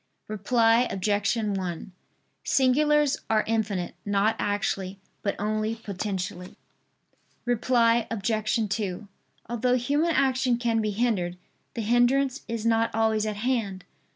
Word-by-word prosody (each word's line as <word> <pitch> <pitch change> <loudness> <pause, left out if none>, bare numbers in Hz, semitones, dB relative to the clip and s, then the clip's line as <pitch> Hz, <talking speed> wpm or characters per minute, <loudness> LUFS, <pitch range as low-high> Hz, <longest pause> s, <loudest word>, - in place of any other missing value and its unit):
Reply 225 +3 +3
Obj. 205 +3 0
1: 195 -5 -3 0.5
Singulars 295 +2 +3
are 220 -1 +3
infinite; 210 -5 -1
not 205 +2 +1
actually, 195 -2 -1 0.2
but 200 - -1
only 215 +2 -1
potentially. 190 -4 -5 0.9
Reply 235 -1 +2
Obj. 215 +1 0
2: 200 -1 -3 0.4
Although 240 +2 +1
human 290 +7 +1
action 260 -2 +2
can 230 -2 +1
be 215 - -1
hindered, 200 -5 0 0.4
the 235 - -2
hindrance 250 +4 +2
is 230 -1 -4
not 230 0 +3
always 220 -1 +1
at 210 - -2
hand. 210 -5 -2
220 Hz, 115 wpm, -26 LUFS, 205-245 Hz, 0.9 s, Reply